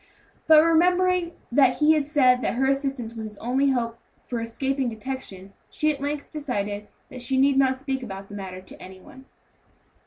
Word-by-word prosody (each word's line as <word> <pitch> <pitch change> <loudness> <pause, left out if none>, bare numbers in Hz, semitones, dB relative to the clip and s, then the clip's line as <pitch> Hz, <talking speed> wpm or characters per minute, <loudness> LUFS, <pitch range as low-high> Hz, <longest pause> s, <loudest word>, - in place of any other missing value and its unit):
But 315 -1 +8
remembering 355 +1 +3 0.2
that 260 0 +4
he 305 +1 +5
had 300 -3 0
said 255 -5 +4
that - - -1
her 265 +2 +1
assistance 270 -4 -1
was 225 -1 -6
his 210 -1 -8
only 260 +5 +1
hope 235 -3 -1 0.3
for 240 - -3
escaping 265 +3 -2
detection, 220 -5 -7 0.2
she 305 0 0
at 280 - -10
length 290 0 -4
decided 210 -8 -3 0.2
that 255 -3 -8
she 260 +2 0
need 275 +1 +4
not 265 -1 +3
speak 265 0 -4
about 195 -5 -7
the 205 - -12
matter 185 -2 -7
to 185 - -13
any 185 0 -11
one. 265 +7 -15
265 Hz, 185 wpm, -25 LUFS, 230-285 Hz, 0.3 s, But